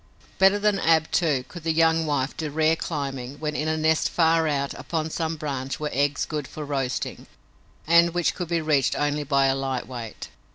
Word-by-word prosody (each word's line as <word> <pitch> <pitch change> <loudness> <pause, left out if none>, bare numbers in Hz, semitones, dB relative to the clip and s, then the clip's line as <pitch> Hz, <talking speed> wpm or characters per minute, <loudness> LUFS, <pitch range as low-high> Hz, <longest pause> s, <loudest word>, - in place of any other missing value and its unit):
Better 195 +1 +6
than 205 -1 +1
Ab, 160 -2 +2
too, 145 -7 +1
could 175 - -10
the 165 +1 0
young 160 0 +3
wife 140 -2 -1
do 155 -2 -4
rare 155 +2 +2
climbing 135 -5 -4
when 150 -1 -3
in 150 - -1
a 160 0 0
nest 160 0 +2
far 165 -1 +3
out 140 -2 -1
upon 160 -1 -3
some 160 0 -2
branch 135 -3 -4
were 150 -1 -3
eggs 145 +2 +1
good 150 -3 -4
for 155 - -7
roasting 135 -3 -3 0.6
and 170 +1 +5
which 175 -1 +1
could 180 - -5
be 170 0 0
reached 150 -4 +2
only 145 0 0
by 140 -1 +2
a 135 - +3
light 135 -2 -3
weight. 120 -4 -7
155 Hz, 200 wpm, -25 LUFS, 140-165 Hz, 0.6 s, Better